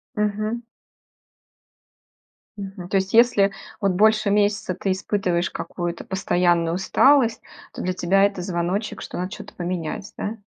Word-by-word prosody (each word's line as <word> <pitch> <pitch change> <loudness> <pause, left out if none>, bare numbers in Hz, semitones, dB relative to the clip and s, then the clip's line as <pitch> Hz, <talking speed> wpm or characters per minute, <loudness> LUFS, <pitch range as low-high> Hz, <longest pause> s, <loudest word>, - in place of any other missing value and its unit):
Мгм. 215 +2 -1 2.0
Мгм. 190 -2 -7
То 195 - +2
есть, 190 0 -1
если 225 -4 +5 0.3
вот 200 -2 +2
больше 215 +2 +3
месяца 205 -2 +1
ты 190 +1 -1
испытываешь 185 -2 0
какую-то 175 -1 -5
постоянную 175 -3 +1
усталость, 235 +5 +3 0.3
то - - -6
для 185 - -1
тебя 185 +2 +2
это 200 -2 +1
звоночек, 180 +4 -2
что - - -7
надо 185 +1 -3
что-то - - -9
поменять, 175 +2 -4
да? 215 +2 -4
195 Hz, 130 wpm, -23 LUFS, 180-210 Hz, 2.0 s, если